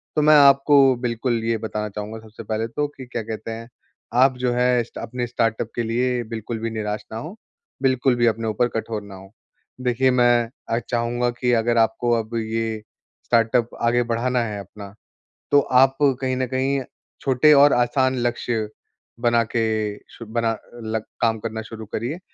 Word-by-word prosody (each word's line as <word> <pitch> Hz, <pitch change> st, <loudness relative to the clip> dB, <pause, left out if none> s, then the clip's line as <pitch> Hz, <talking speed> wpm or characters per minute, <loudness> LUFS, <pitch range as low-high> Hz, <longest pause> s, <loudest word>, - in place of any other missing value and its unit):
तो 150 Hz, -, +3 dB
मैं 155 Hz, +1 st, +6 dB
आपको 140 Hz, -1 st, +6 dB
बिल्कुल 120 Hz, -1 st, -1 dB
ये 115 Hz, 0 st, 0 dB
बताना 105 Hz, -1 st, -4 dB
चाहूँगा 105 Hz, +2 st, -6 dB
सबसे 110 Hz, 0 st, -12 dB
पहले 110 Hz, +1 st, -2 dB
तो 145 Hz, +6 st, -2 dB
कि 130 Hz, -, -8 dB
क्या 120 Hz, -1 st, -4 dB
कहते 110 Hz, +1 st, -6 dB
हैं, 115 Hz, +1 st, -7 dB, 0.4 s
आप 130 Hz, +1 st, +4 dB
जो 125 Hz, -1 st, 0 dB
है 125 Hz, 0 st, +2 dB
स्टा 115 Hz, -, -10 dB
अपने 125 Hz, +1 st, -4 dB
स्टार्टअप 115 Hz, -1 st, -1 dB
के 120 Hz, -, -1 dB
लिए 120 Hz, +2 st, 0 dB
बिल्कुल 115 Hz, 0 st, -5 dB
भी 115 Hz, +1 st, -2 dB
निराश 105 Hz, -1 st, -3 dB
न -, -, -5 dB
हों, 155 Hz, -, -6 dB, 0.5 s
बिल्कुल 130 Hz, -1 st, +2 dB
भी 120 Hz, 0 st, +2 dB
अपने 115 Hz, 0 st, 0 dB
ऊपर 110 Hz, +3 st, +1 dB
कठोर 110 Hz, -1 st, -3 dB
ना 100 Hz, -1 st, -11 dB
हो। 95 Hz, +1 st, -13 dB, 0.5 s
देखिए, 125 Hz, +1 st, +2 dB
मैं 120 Hz, -2 st, +3 dB, 0.2 s
अ, 115 Hz, -, +1 dB
चाहूँगा 120 Hz, +1 st, 0 dB
कि 125 Hz, -1 st, +1 dB
अगर 120 Hz, +1 st, 0 dB
आपको 115 Hz, +1 st, +2 dB
अब 115 Hz, +1 st, -6 dB
ये 110 Hz, -1 st, -2 dB, 0.4 s
स्टार्टअप 115 Hz, 0 st, +2 dB
आगे 120 Hz, +1 st, +2 dB
बढ़ाना 120 Hz, +2 st, 0 dB
है 105 Hz, -3 st, -4 dB
अपना, 100 Hz, +1 st, -10 dB, 0.6 s
तो 145 Hz, -, +7 dB
आप 135 Hz, 0 st, +3 dB
कहीं 130 Hz, -2 st, +1 dB
न 130 Hz, -, 0 dB
कहीं 135 Hz, +2 st, 0 dB, 0.4 s
छोटे 135 Hz, +3 st, +4 dB
और 145 Hz, 0 st, +6 dB
आसान 130 Hz, +2 st, +2 dB
लक्ष्य 120 Hz, -2 st, -1 dB, 0.5 s
बना 120 Hz, -1 st, +3 dB
के 115 Hz, +1 st, -1 dB, 0.5 s
सु 115 Hz, -, -11 dB
बना 115 Hz, +1 st, 0 dB, 0.3 s
लग 110 Hz, 0 st, -2 dB, 0.2 s
काम 115 Hz, -1 st, +2 dB
करना 110 Hz, 0 st, -4 dB
शुरू 110 Hz, 0 st, -9 dB
करिए, 120 Hz, -, -4 dB
120 Hz, 175 wpm, -22 LUFS, 110-125 Hz, 0.6 s, तो